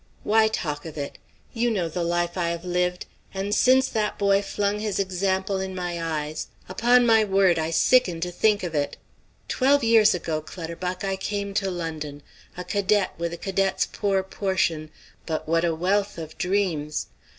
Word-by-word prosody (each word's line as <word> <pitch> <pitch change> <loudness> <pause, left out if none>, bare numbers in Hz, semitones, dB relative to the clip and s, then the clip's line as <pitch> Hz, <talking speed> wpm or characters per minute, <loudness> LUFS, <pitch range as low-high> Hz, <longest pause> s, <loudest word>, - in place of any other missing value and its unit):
Why 220 +1 +4
talk 150 -9 -3
of 155 - -9
it? 140 -1 -5 0.3
You 240 +1 +1
know 190 -7 0
the 170 +2 -3
life 175 0 0
I 175 -2 0
have 170 +1 -4
lived, 180 0 -1 0.3
and 195 +2 -2
since 260 +4 +4
that 215 -1 -1
boy 200 -1 +3
flung 205 0 -1
his 210 -3 -2
example 190 0 0
in 190 0 -4
my 175 -2 -3
eyes, 155 -1 -3 0.2
upon 240 +6 +4
my 225 -2 +5
word 190 -4 +3
I 160 0 -1
sicken 175 +1 +3
to 175 +1 -2
think 205 +3 +2
of 175 -2 -3
it. 145 -2 -1 0.5
Twelve 280 +1 +3
years 220 -3 +5
ago, 160 -3 -2
Clutterbuck, 180 +3 -5
I 195 -1 -1
came 200 +1 -3
to 195 -1 0
London, 155 -5 -5 0.3
a 180 - -4
cadet 200 +2 +1
with 170 0 -2
a 170 - -5
cadet's 195 +1 0
poor 195 -2 0
portion, 190 -5 -1 0.4
but 160 -2 -3
what 165 +1 +2
a 170 -2 +1
wealth 195 +4 0
of 160 -1 -7
dreams! 180 -6 0
185 Hz, 175 wpm, -25 LUFS, 170-205 Hz, 0.5 s, my